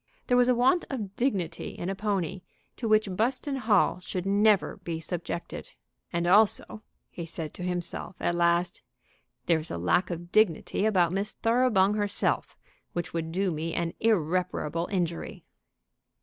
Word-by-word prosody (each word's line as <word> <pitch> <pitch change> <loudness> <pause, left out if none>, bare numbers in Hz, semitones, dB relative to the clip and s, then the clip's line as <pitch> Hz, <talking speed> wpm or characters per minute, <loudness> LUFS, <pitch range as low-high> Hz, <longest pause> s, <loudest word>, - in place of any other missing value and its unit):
There 245 - +2
was 245 0 +4
a 250 - +4
want 260 +9 +3
of 210 -8 -5
dignity 190 - -2
in 175 - -4
a 195 - -1
pony 195 -3 -2 0.4
to 235 - -3
which 215 -1 +4
Buston 255 +6 0
Hall 215 -6 +2
should 180 0 -5
never 205 0 +3
be 165 -1 -5
subjected. 170 0 -5 0.4
"And 170 0 -1
also," 210 +3 +3 0.3
he 170 -2 -6
said 160 -2 -5
to - - -10
himself 180 +1 -3
at - - 0
last, 170 +1 +1 0.6
"there 165 -2 +3
is 155 - -6
a - - -4
lack 90 - +1
of 175 0 -6
dignity 215 0 +2
about 180 -6 +3
Miss 195 +2 -2
Thoroughbung 225 -4 +3
herself 205 -1 0 0.4
which 175 -1 -4
would 165 -1 -3
do 190 +2 0
me 160 +1 -3
an 170 -1 -1
irreparable 175 -5 0
injury." 175 -4 -3
185 Hz, 155 wpm, -28 LUFS, 170-215 Hz, 0.6 s, was